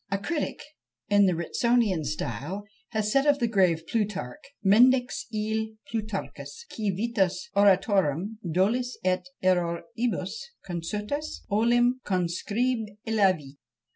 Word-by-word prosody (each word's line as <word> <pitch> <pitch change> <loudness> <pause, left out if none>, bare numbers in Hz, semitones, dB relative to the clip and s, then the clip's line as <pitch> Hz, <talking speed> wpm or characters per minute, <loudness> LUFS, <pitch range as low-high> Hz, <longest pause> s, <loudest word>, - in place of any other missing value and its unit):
A 195 - 0
critic 295 +10 -3 0.5
in 205 -1 +5
the 180 - +2
Ritsonian 210 +1 +1
style 150 - -4 0.3
has 215 -2 -1
said 275 +4 +3
of 290 -1 +5
the 240 -4 +1
grave 185 -7 +2
Plutarch, 210 - -2 0.3
Mendax 245 +5 +4
ille 220 0 -2 0.2
Plutarchus 220 - -5
qui 215 -2 -1
vitas 200 +3 0
oratorum, 195 -1 +3
dolis 230 +9 +1
et 185 0 +1 0.2
erroribus 185 +4 0 0.4
consutas, 210 - -4
olim 240 +4 +3
conscribillavit. 200 - 0
205 Hz, 105 wpm, -27 LUFS, 185-235 Hz, 0.5 s, in